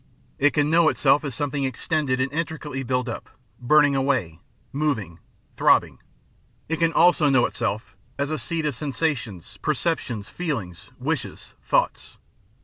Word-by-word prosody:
It 145 +1 +4
can 150 0 +2
know 165 -1 +5
itself 140 +1 +3
as 140 -5 -4
something 145 +1 -2
extended 135 +1 -1
and 135 +2 -1
intricately 155 -4 -3
built 125 0 -1
up, 115 - -6 0.3
burning 145 +2 +4
away, 130 - 0 0.3
moving, 125 - -1 0.3
throbbing; - - +3 0.7
it 165 - -1
can 165 -1 +3
also 165 -3 +4
know 130 -3 +4
itself 110 -3 -3 0.2
as 140 +1 -1
the 155 -1 -2
seat 160 +5 -2
of 150 - 0
sen 140 +2 -4
sations, 120 - -3
perceptions, 140 -8 -1
feelings, 115 - -5
wishes, - - -4
thoughts. - - 0
140 Hz, 145 wpm, -24 LUFS, 120-155 Hz, 0.7 s, know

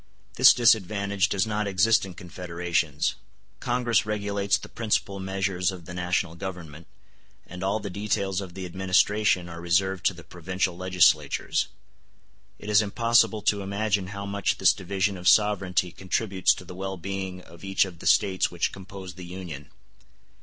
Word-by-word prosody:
This - - +8
disadvantage 100 -3 +2
does 100 0 +1
not 105 -1 -2
exist 100 +2 +3
in 90 - -10
confederations. 85 -4 -2 0.5
Congress 120 -2 +1
regulates 100 -2 0
the - - -10
principal 105 -3 -1
measures 95 -1 -1
of 90 -3 -10
the 90 - -8
national 90 -1 -1
Government, 85 -3 -8 0.6
and 90 +1 -8
all 100 +3 0
the 100 - -6
details 100 -1 -1
of 90 -3 -9
the 95 -1 -5
administration 95 +1 +2
are 85 -1 -8
reserved 95 +2 +1
to 95 - 0
the 85 - -12
provincial 90 +2 -3
legislatures. 95 -1 +2 0.9
It - - -11
is 105 0 +5
impossible 115 0 +2
to 100 -1 +1
imagine 100 0 -1
how 100 +1 -6
much 100 -1 -1
this 90 -4 +5
division 95 +1 -2
of 90 +1 -4
sovereignty 95 -3 +3
contributes 95 +1 +1
to 90 - -11
the 90 - -9
well 95 +1 -5
being 95 +1 -5
of 85 0 -16
each 95 0 +2
of 90 -4 -10
the - - -5
States 95 -3 +3
which 85 -1 -1
compose 95 -1 -9
the 90 0 -10
Union. 85 -6 -8
95 Hz, 160 wpm, -26 LUFS, 90-100 Hz, 0.9 s, This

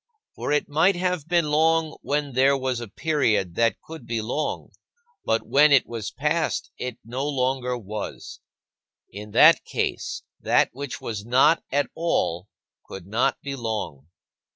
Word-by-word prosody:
For - - -4
it 150 - +1
might 160 +6 +3
have 180 -3 -2
been 170 -3 +1
long 160 +1 +2
when 145 -1 -2
there 135 +2 +4
was 130 -2 -2
a 120 - -6
period 110 - 0
that 115 +4 +1
could 160 -7 -11
be 115 -1 -1
long, 125 +8 -3 0.5
but 110 - 0
when 150 +2 +5
it 140 -3 +5
was 115 -3 -5
past, 155 +3 -1
it 125 -1 -4
no 125 +4 -4
longer 130 -3 -1
was. 105 -2 -7 0.7
In 105 +2 -8
that 155 +7 +7
case, - - -3 0.2
that - - +3
which 140 -2 -6
was 105 -3 -5
not 130 +8 +4
at 145 +1 0
all 100 - -1 0.4
could 95 -3 -9
not 110 +5 0
be 140 -1 -4
long. 110 - -4
135 Hz, 155 wpm, -24 LUFS, 115-150 Hz, 0.7 s, that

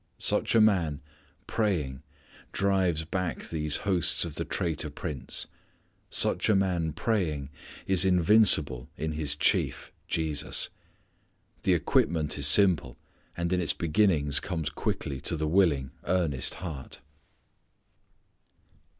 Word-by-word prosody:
Such - - +1
a 115 - +6
man 90 -9 +2 0.5
praying 80 - -1 0.5
drives 95 -5 +1
back 90 +1 -3
these 75 -2 0
hosts 90 -3 +2
of 85 - -6
the - - -3
traitor 80 -2 -2
prince. 70 -2 -4 0.6
Such - - +2
a 105 - +4
man 90 -4 0
praying 75 - -2 0.3
is 95 -1 +4
invincible 90 - +3
in 80 0 -3
his 75 -2 0
Chief, - - 0 0.2
Jesus. 80 -3 -1 0.9
The - - +2
equipment 80 -1 +1
is 70 - +5
simple, 80 -7 +4 0.4
and 85 +1 -1
in 90 - +1
its 75 -4 +1
beginnings 75 -3 +2
comes 80 -6 -4
quickly 65 -2 -3
to - - +1
the 80 0 -1
willing, 75 -7 +2
earnest 85 -8 0
heart. 80 -7 -8
80 Hz, 115 wpm, -28 LUFS, 75-95 Hz, 0.9 s, a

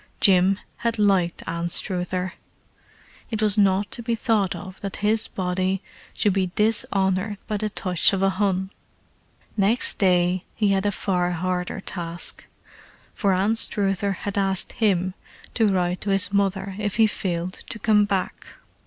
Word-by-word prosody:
Jim 190 0 +4 0.2
had 230 -1 -1
liked 195 -5 +2
Anstruther: 180 +2 -1 1.0
it 220 - -3
was 210 -2 +3
not 200 -1 +2
to - - -2
be 235 0 -1
thought 215 -4 +1
of 190 -1 -9
that 200 -1 -4
his 220 +1 +1
body 185 +1 -1 0.3
should 205 - +2
be 190 -1 0
dishonoured 200 -2 +1
by 210 - -2
the 215 +1 -1
touch 185 -4 +1
of 195 -1 0
a 195 - +3
Hun. 190 -1 0 0.8
Next 215 +4 +2
day 180 -1 +3
he 210 -3 +2
had 195 +1 +2
a - - +2
far 180 -3 0
harder 180 +1 -2
task, 170 -2 -6 0.7
for 195 -3 +1
Anstruther 200 -1 +2
had 200 +1 -3
asked 195 -1 0
him 190 -4 +1 0.4
to 220 -4 +3
write 180 -1 0
to 205 - -3
his 195 0 +1
mother 195 -1 0
if 210 -2 -2
he 225 - +5
failed 185 -3 -3
to - - -5
come 210 -1 +3
back. 195 -2 -3
195 Hz, 150 wpm, -24 LUFS, 185-205 Hz, 1.0 s, he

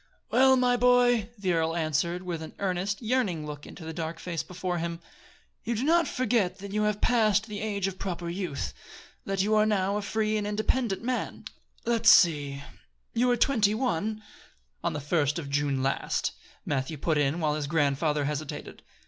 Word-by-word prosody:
"Well, 265 +1 +6
my 250 -1 +3
boy," 245 -3 +4
the 190 -3 0
earl 165 0 +1
answered, 170 +2 0
with 175 -3 -4
an 160 - -9
earnest, 195 +3 -2
yearning 215 -10 0
look 150 -1 -8
into 165 - -10
the 160 - -5
dark 160 0 -4
face 165 -2 -3
before 180 +1 -4
him, 170 0 -3 0.6
"you 235 - -1
do 225 - -1
not 335 +3 +3
forget 230 -7 0
that 200 0 -8
you 210 - +1
have 210 -1 -1
passed 220 -3 +3
the 210 -2 -6
age 205 -3 -1
of 195 -1 -4
proper 175 -3 -4
youth 170 -6 -3 0.5
that 195 -1 0
you 215 +2 +1
are 215 0 +5
now 200 -1 +1
a - - -2
free 215 +1 0
and 205 -1 -2
independent 215 +1 0
man. 250 +1 -3 0.4
Let's 230 -1 +4
see 145 -5 +4 0.5
you 240 +2 +2
were 245 -1 +3
twenty 215 -7 +3
one 215 -2 -1 0.3
" - - -40
"On - - 0
the 150 - -3
first 150 0 +1
of 145 -4 -5
June 140 -2 0
last," 135 +1 0 0.3
Matthew 140 +2 -2
put 155 +1 +1
in, 145 +3 +1
while 155 -2 +1
his 150 -1 -2
grandfather 150 -1 +1
hesitated. 150 0 -5
185 Hz, 185 wpm, -28 LUFS, 155-215 Hz, 0.6 s, Well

